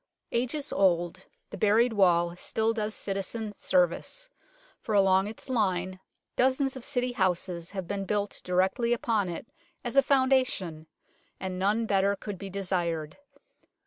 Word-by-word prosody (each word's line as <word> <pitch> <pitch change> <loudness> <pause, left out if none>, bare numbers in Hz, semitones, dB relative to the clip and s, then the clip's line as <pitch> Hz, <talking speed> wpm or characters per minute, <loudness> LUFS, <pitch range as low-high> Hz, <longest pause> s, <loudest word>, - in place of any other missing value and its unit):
Ages 255 +5 -1
old, 175 -1 +1 0.2
the - - -7
buried 225 +3 +4
wall 175 -4 +3
still 220 +5 0
does 215 -1 -2
citizen 205 +2 -3
service, 185 - 0 0.5
for 215 - -2
along 195 0 +4
its 220 +5 -8
line 185 -6 0 0.4
dozens 265 +1 +2
of 260 - -8
City 250 -2 -1
houses 180 -5 -1
have 190 -3 -5
been 200 -1 -3
built 205 +1 -2
directly 190 +6 +1
upon 220 -5 0
it 170 - -5 0.4
as 240 +1 -3
a 275 - +8
foundation 260 - +1 0.5
and 185 -1 -4
none 210 +4 +2
better 200 -1 +2
could 200 -2 -7
be 195 - -6
desired. 175 -5 -2
200 Hz, 140 wpm, -28 LUFS, 185-235 Hz, 0.5 s, a